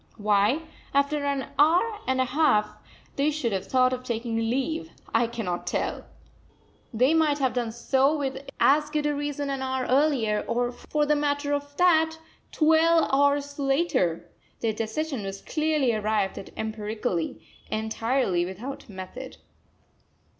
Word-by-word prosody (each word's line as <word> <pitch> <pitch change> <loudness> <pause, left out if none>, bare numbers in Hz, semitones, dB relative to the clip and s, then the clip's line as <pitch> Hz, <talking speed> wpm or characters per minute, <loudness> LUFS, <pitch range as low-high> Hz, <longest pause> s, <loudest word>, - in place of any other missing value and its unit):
Why, 210 +7 +2 0.3
after 285 +1 +2
an 280 -1 -1
hour 360 +9 +4
and 260 0 +1
a 260 - +3
half, 255 -6 +2 0.4
they 280 +2 +3
should 290 -6 -1
have 190 -1 -3
thought 255 0 +3
of 255 0 -4
taking 235 -1 -3
leave, 270 +9 -1 0.2
I 230 +1 +3
cannot 225 -7 -4
tell. - - -2 0.8
They 255 +6 +3
might 310 -3 +3
have 265 -3 0
done 240 -2 -1
so 265 +5 +2
with 270 -1 -4
as 300 +2 +4
good 300 -1 -1
a 295 - +1
reason 290 -1 -3
an 270 -1 -3
hour 260 -1 -1
earlier, 255 -6 +2
or, 245 +1 0
for 295 +4 -2
the 300 0 +3
matter 290 0 0
of 285 0 -4
that, 320 -3 +4 0.3
twelve 325 +1 +4
hours 285 +1 +2
later! 270 - +1 0.3
Their 225 -2 0
decision 230 +4 -3
was 195 0 -6
clearly 305 -5 +1
arrived 215 -2 0
at - - -10
empirically, 215 -4 -3 0.3
entirely 220 -3 0
without 220 +10 -7
method. 205 +7 -8
265 Hz, 145 wpm, -26 LUFS, 225-295 Hz, 0.8 s, hour